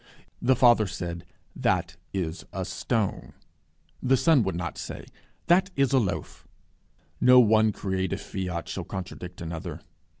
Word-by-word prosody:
The 130 +2 +4
Father 120 -4 +5
said, 85 -1 -5 0.3
That - - 0 0.2
is 85 -4 -3
a - - -3
stone. 110 -5 -2 0.7
The 130 0 +3
Son 140 +1 +4
would 95 -4 -1
not 85 0 -4
say, - - -7 0.4
That 185 +3 +4
is 140 0 +2
a 135 - +6
loaf. 100 -6 -4 0.7
No 125 0 +7
one 110 -2 +5
creative 95 -2 -2
fiat 90 -3 -4
shall - - -4
contradict 90 -1 -7
another. 80 -1 -6
100 Hz, 135 wpm, -27 LUFS, 90-125 Hz, 0.7 s, No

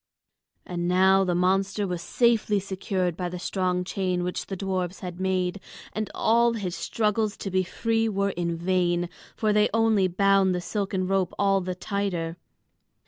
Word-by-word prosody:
And 175 -1 -3
now 190 +2 +5
the 180 -2 0
monster 195 +3 +1
was 180 -3 -3
safely 215 +2 +2
secured 190 -2 -2
by 180 0 -3
the 180 - -5
strong 180 0 -1
chain 180 -1 -1
which 180 0 -3
the 195 - -4
dwarfs 185 -1 -3
had 180 -2 -6
made, 185 0 0 0.3
and 215 0 -3
all 235 +1 +3
his 195 -6 -3
struggles 215 -1 0
to 195 - -5
be 185 0 +2
free 225 +4 0
were 200 -1 0
in 170 -1 -2
vain, 175 0 +1 0.3
for 215 -2 +1
they 210 0 +4
only 220 -4 +3
bound 195 0 +3
the - - -1
silken 195 0 -2
rope 190 -1 0
all 195 -1 +3
the 185 0 -3
tighter. 180 -4 -2
190 Hz, 165 wpm, -26 LUFS, 180-200 Hz, 0.3 s, now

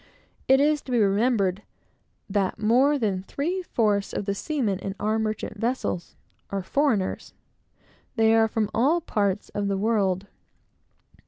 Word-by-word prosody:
It 265 +1 +6
is 295 +1 +3
to 260 - -9
be 245 - +2
remembered 205 -2 +2 0.7
that 195 -2 0
more 250 +7 +3
than 200 -7 -1
three 320 - -3
fourths 210 - 0
of 205 - -3
the 200 - 0
seamen 215 -4 -2
in 195 0 -5
our 215 +2 0
merchant 215 -1 -3
vessels 230 -6 -2 0.3
are 195 -1 -3
foreigners. 230 -5 0 0.8
They 225 -1 +4
are 225 0 +4
from 215 -1 -1
all 285 +9 +3
parts 205 - -1
of 205 -1 -2
the 200 -1 0
world. 200 -3 +1
215 Hz, 145 wpm, -25 LUFS, 200-255 Hz, 0.8 s, It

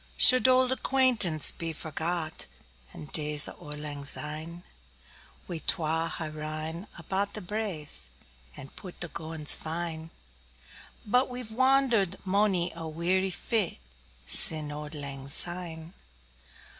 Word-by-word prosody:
Should 255 -2 +7
auld 255 0 +4
acquaintance 255 - +2
be 165 -1 -5
forgot, 160 +1 -4 0.4
And 150 - -10
days 150 -1 +4
o' - - -11
lang 150 -1 -6
syne? 155 +4 -2 0.8
We 170 -2 -5
twa 165 0 0
hae 160 -1 -5
rin 155 +4 -5
about 190 +4 -3
the - - -4
braes, 175 - -3 0.5
5 - - -8
And 135 - -11
pu'd 185 -2 -10
the 175 - -3
gowans 160 -2 0
fine; 160 0 -5 1.0
But 250 +5 +2
we've 245 -3 -7
wander'd 255 -5 +2
monie 190 -3 +1
a 165 -1 -6
weary 180 +4 0
fit 210 +1 -1 0.5
Sin' 150 - +5
auld 150 +1 -7
lang 140 -2 -7
syne. 170 +1 +4
165 Hz, 120 wpm, -28 LUFS, 155-200 Hz, 1.0 s, Should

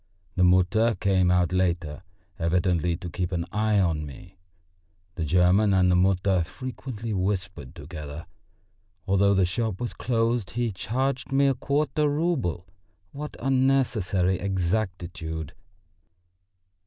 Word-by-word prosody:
The 90 - +2
Mutter 95 +6 +3
came 95 -2 +2
out 90 -1 +2
later, 85 -4 -1 0.4
evidently 85 0 +1
to 90 - -7
keep 90 0 -3
an 85 -2 -2
eye 105 0 +1
on 80 -5 +1
me. 85 +6 -11 0.7
The 85 - -4
German 90 +5 +3
and 90 -1 +4
the - - +4
Mutter 95 0 +2
frequently 120 0 -6
whispered 95 -7 -3
together. 75 +1 -8 0.8
Although 100 +1 +3
the 95 -1 +3
shop 100 +2 -2
was 120 - -3
closed 115 -3 0
he 120 -2 0
charged 130 +7 -2
me 140 +1 +3
a 135 - +4
quarter 145 +2 0
rouble! 145 - -1 0.5
What 150 +1 -7
unnecessary 125 -9 +1
exactitude! 90 -5 -3
95 Hz, 120 wpm, -26 LUFS, 90-115 Hz, 0.8 s, and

